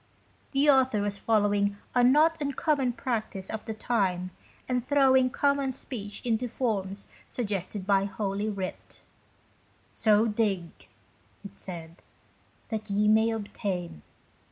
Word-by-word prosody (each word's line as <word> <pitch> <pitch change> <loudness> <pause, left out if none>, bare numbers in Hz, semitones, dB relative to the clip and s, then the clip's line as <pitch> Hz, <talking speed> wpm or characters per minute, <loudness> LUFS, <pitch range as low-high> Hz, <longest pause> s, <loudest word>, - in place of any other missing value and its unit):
The 275 +1 +2
author 260 -6 +4
was 205 0 -2
following 205 -2 +2 0.2
a 245 - +4
not 305 +5 +4
uncommon 280 -2 0
practise 225 -5 -3
of 220 - -4
the 220 - -3
time, 185 -6 0 0.4
and 250 -1 0
throwing 265 -1 +4
common 280 0 +1
speech 220 -6 -7
into 235 +1 0
forms 200 -5 -2 0.2
suggested 200 -4 -3
by 195 -1 +3
Holy 200 +1 -2
Writ: 195 -3 -6 0.5
" - - -35
So 215 0 +3
dig," 205 -6 -2 0.6
it 200 - -8
said, 170 -4 -7 0.3
" - - -35
that 220 -2 -4
ye 205 +1 +2
may 220 +1 +5
obtain." 195 - -4
215 Hz, 130 wpm, -28 LUFS, 200-250 Hz, 0.6 s, may